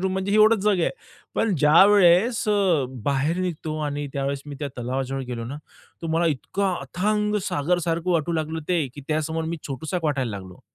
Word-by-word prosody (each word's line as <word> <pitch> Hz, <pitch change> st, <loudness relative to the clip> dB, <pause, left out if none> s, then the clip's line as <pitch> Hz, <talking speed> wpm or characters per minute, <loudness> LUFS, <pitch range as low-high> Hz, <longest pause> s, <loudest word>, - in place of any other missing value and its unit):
Room 190 Hz, 0 st, 0 dB
म्हणजे 190 Hz, +1 st, -2 dB
ही 205 Hz, -, +3 dB
एवढंच 215 Hz, +1 st, +6 dB
जग 205 Hz, -4 st, +3 dB
आहे. -, -, +2 dB, 0.4 s
पण 220 Hz, -4 st, +1 dB
ज्यावेळेस 190 Hz, -, +5 dB
अ, 190 Hz, -8 st, +3 dB, 0.2 s
बाहेर 140 Hz, +4 st, +1 dB
निघतो 160 Hz, -4 st, -3 dB
आणि 145 Hz, 0 st, -3 dB
त्यावेळेस 140 Hz, 0 st, -2 dB
मी 145 Hz, -, -6 dB
त्या 145 Hz, -, -3 dB
तलावाजवळ 130 Hz, +2 st, -2 dB
गेलो 115 Hz, -1 st, -4 dB
ना, 135 Hz, +5 st, -6 dB, 0.5 s
तर 165 Hz, -, -3 dB
मला 170 Hz, +1 st, +2 dB
इतकं 185 Hz, +6 st, -1 dB
अथांग 210 Hz, +9 st, -1 dB
सागरसारखं 170 Hz, +3 st, 0 dB
वाटू 170 Hz, -1 st, +1 dB
लागलं 160 Hz, 0 st, -2 dB
ते, 170 Hz, -5 st, +1 dB
की 145 Hz, -, -8 dB
त्यासमोर 160 Hz, +1 st, -1 dB
मी 165 Hz, +1 st, -3 dB
छोटूसा 145 Hz, +5 st, -4 dB
एक 175 Hz, -, -4 dB
वाटायला 140 Hz, -6 st, 0 dB
लागलो. 95 Hz, +3 st, -11 dB
160 Hz, 185 wpm, -24 LUFS, 145-185 Hz, 0.5 s, एवढंच